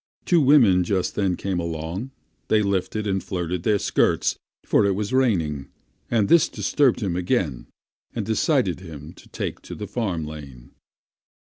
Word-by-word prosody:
Two 175 -3 +4
women 125 -11 +5
just 95 0 -1
then 95 -3 0
came 95 -1 -2
along; 85 +7 -4 0.4
they 110 -1 +3
lifted 100 +2 -1
and 95 -2 -1
flirted 90 -1 -3
their 105 +3 +2
skirts, - - +1 0.3
for - - +3
it 100 -1 +2
was 105 +3 -3
raining, 85 - +1 0.4
and 110 -4 +2
this 170 +5 +5
disturbed 140 -5 +1
him 95 -5 -1
again 90 - -1 0.5
and 110 - -2
decided 110 - +1
him 80 -3 -10
to - - -18
take - - -5
to - - -9
the - - -6
farm 95 -10 -2
lane. 70 -6 -10
95 Hz, 155 wpm, -23 LUFS, 85-110 Hz, 0.5 s, women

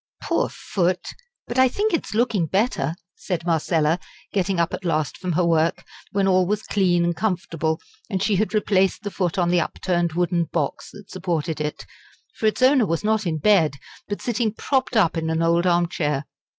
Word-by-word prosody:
"Poor - - 0
foot! 180 -1 -1 0.4
but 240 +2 -2
I 260 - +7
think 415 - -1
it 330 - 0
is - - -6
looking 220 -7 +1
better," 190 - 0 0.2
said 175 -3 -4
Marcella, 165 0 +1 0.3
getting 190 -2 0
up 170 0 +1
at - - -4
last 155 -5 0
from 180 -2 -3
her 175 +2 +2
work, 165 -1 +2 0.3
when 195 -1 +1
all 185 -1 +3
was 210 +2 -1
clean 180 -4 +2
and 170 0 0
comfortable 165 -5 -1 0.3
and 190 -3 -1
she 205 -2 +2
had 215 +3 0
replaced 195 -1 +2
the 205 - -4
foot 180 -1 -1
on 175 -2 +2
the 175 -1 +3
upturned 175 0 -1
wooden 175 0 +1
box - - -3
that 205 -1 -13
supported 165 -4 -2
it 150 0 -4 0.5
for 220 - 0
its 215 +4 0
owner 260 -4 +5
was 165 -1 -1
not 215 -2 +1
in 160 -2 -1
bed, 160 -4 +3 0.3
but 205 - -5
sitting 230 -2 0
propped 260 -2 0
up 175 -5 +3
in 160 0 -1
an 160 +1 0
old 170 +2 +3
armchair. 165 -5 +1
180 Hz, 190 wpm, -23 LUFS, 165-205 Hz, 0.5 s, I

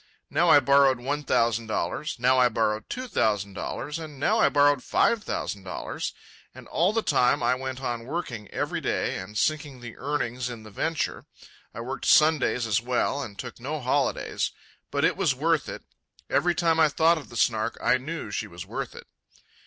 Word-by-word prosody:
Now 165 +4 +3
I 145 - +8
borrowed 140 -1 +4
one 140 +4 -2
thousand 115 -3 +1
dollars, 110 - -2
now 130 +2 +3
I 125 -1 +5
borrowed 110 -2 -1
two 255 +1 -4
thousand 105 - 0
dollars, 150 - -4
and 155 -4 -9
now 145 - +2
I - - +5
borrowed 145 -2 +3
five 230 -2 +2
thousand 100 - -3
dollars. 95 - -4 0.4
And - - -12
all 175 +5 +2
the 225 0 0
time 125 -3 +2
I 120 - +3
went 130 0 -5
on 120 -2 -3
working 125 -9 -4
every - - -3
day - - -1
and 100 +3 -7
sinking 145 -1 -1
the 120 -1 -9
earnings 125 -3 -2
in 115 -3 -8
the 110 - -12
venture. 160 +9 -2 0.4
I 115 - -7
worked 130 +3 -5
Sundays 150 -6 +4
as 110 -1 +1
well, 125 +3 0
and 105 - -6
I - - -5
took 125 -1 -9
no 145 +5 -4
holidays. 135 +1 0 0.4
But - - +1
it - - +2
was 130 - +1
worth 160 +2 +1
it. - - -7 0.5
Every 175 0 +2
time 165 -2 +2
I 155 -1 +6
thought 160 +3 +3
of 145 - -12
the 120 - -8
Snark 110 0 +1
I 130 - +3
knew 155 -4 -5
she - - -3
was 85 0 -9
worth - - -5
it. - - -10
130 Hz, 195 wpm, -26 LUFS, 115-150 Hz, 0.5 s, I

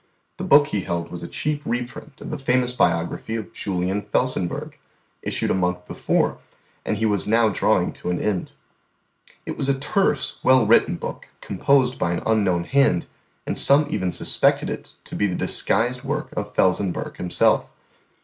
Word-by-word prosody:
The - - -5
book 145 0 +5
He 100 - -1
held 85 -1 -4
was 90 - -7
a 85 - -6
cheap 150 - -2
reprint 125 +4 -5
of - - -7
the 155 - -4
famous 125 -2 +1
biography 85 0 0
of 110 -2 -6
Julian 95 +1 -2
Felsenburgh, 105 -3 -2 0.5
issued - - -2
a - - +3
month 90 -1 -1
before, - - -1 0.4
and 105 - -2
He 110 - 0
was 105 -2 0
now 115 +1 +4
drawing - - +1
to - - -6
an 90 - -1
end. 100 -4 -2 0.9
It - - -5
was 135 - -1
a 135 - +2
terse, 170 +8 0
well 130 -3 +4
written 115 +3 +4
book, - - -7
composed 130 +5 +1
by 85 - 0
an 85 - -3
unknown 100 -6 +1
hand, 135 -7 +2 0.4
and - - -2
some 145 +2 +6
even 95 -1 -1
suspected - - +1
it - - -8
to - - -9
be 105 - +1
the 90 - -3
disguised 120 +8 +1
work 150 +3 -4
of 105 0 -5
Felsenburgh 95 0 0
himself. 90 -1 +2
110 Hz, 170 wpm, -22 LUFS, 90-130 Hz, 0.9 s, some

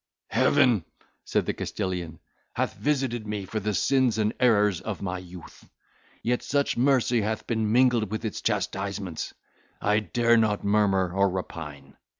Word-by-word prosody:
"Heaven," 115 -9 +3 0.4
said - - 0
the - - -1
Castilian, 90 -5 -4 0.4
"hath - - -1
visited 130 -6 -1
me 105 -2 -3
for 110 +3 -3
the 105 0 -2
sins 130 -2 +2
and 110 0 +1
errors 105 -7 +3
of 105 -3 -5
my 95 -1 -3
youth; 90 -2 -13 0.5
yet, 125 +1 0
such 140 0 0
mercy 125 -2 +3
hath 110 +2 -2
been 110 -2 0
mingled 120 -3 +3
with 110 +2 -4
its 110 - -4
chastisements, 95 -3 -2 0.4
I 105 +1 +2
dare 115 +2 +2
not 110 -2 +1
murmur 100 -3 +2
or 100 +1 +3
repine. 75 -6 -7
105 Hz, 150 wpm, -26 LUFS, 95-120 Hz, 0.5 s, Heaven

